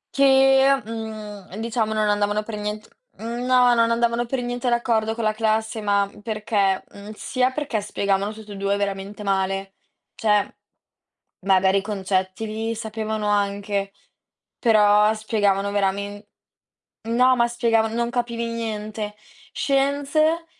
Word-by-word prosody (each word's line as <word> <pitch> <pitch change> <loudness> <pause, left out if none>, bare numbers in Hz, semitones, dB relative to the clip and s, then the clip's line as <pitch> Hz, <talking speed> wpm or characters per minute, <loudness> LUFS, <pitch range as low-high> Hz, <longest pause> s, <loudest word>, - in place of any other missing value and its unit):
che, 270 0 +5
mhmm, 215 -3 -7
diciamo, 225 0 -1
non 215 -1 +1
andavano 205 +1 +1
per 215 0 -6
nient 210 +1 -5 0.3
mhmm, 235 +2 -4
no, 250 -1 +5
non 230 -1 +3
andavano 235 0 +1
per 250 0 -2
niente 245 0 -2
d'accordo 225 -2 +1
con 230 - -4
la 215 0 +2
classe, 220 0 -1
ma 200 -1 +2
perché, 210 -3 0
mhmm, 205 +1 -10
sia 255 +3 0
perché 265 -6 -2
spiegavano 200 0 -1
tutt'e 215 -1 -10
2 200 0 0
veramente 200 +1 -4
male, 195 0 -1 0.4
cioè 210 -2 +1 0.9
magari 190 0 +4
i - - -5
concetti 190 0 -2
li 220 +1 -3
sapevano 220 -1 -3
anche, 200 -1 -1 0.7
però 210 -2 +5
spiegavano 205 -2 0
veramen 200 +1 -1 0.9
no, 250 +2 +4
ma 235 -1 +3
spiegavan 230 -2 +1
non 235 0 0
capivi 235 -2 -2
niente. 215 -2 -4 0.4
Scienze, 285 +4 +1
215 Hz, 130 wpm, -23 LUFS, 205-235 Hz, 0.9 s, che